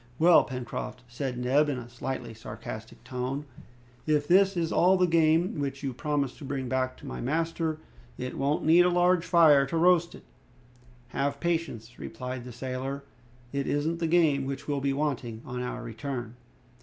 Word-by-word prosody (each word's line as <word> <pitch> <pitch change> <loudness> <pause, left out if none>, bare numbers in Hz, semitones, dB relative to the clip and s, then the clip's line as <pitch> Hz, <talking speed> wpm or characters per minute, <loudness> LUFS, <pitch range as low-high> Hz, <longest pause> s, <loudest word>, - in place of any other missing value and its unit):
"Well, 170 +3 +7
Pencroft," 125 -1 -5
said 125 +1 -4
Neb, 135 +5 +2
in 140 - -1
a 120 -1 -7
slightly 120 -1 -5
sarcastic 110 0 -9
tone, 130 +3 -3 0.6
"if 150 -1 +2
this 195 +1 +4
is 165 -1 0
all 185 +2 +4
the 180 - +4
game 165 +2 +3
which 140 -1 -3
you 135 -2 -2
promised 140 0 -2
to - - -10
bring 135 -1 -3
back 130 0 -1
to - - -13
my - - -5
master, 160 +3 -1 0.4
it 125 0 -5
won't 140 +2 0
need 165 +3 +7
a 180 - +4
large 175 0 +3
fire 155 -6 +5
to 165 - -2
roast 175 0 +4
it!" - - -13 0.9
"Have 140 +2 -1
patience," 145 -9 -2
replied 125 -1 -6
the 125 - -8
sailor, 130 +3 -4 0.5
"it 140 -1 -1
isn't 160 +3 0
the 165 - 0
game 160 -5 +3
which 135 -1 -5
will 145 -2 -1
be 140 0 +1
wanting 130 -6 -2
on 125 -1 -4
our 125 -1 -4
return." 120 0 -5
140 Hz, 175 wpm, -28 LUFS, 125-165 Hz, 0.9 s, Well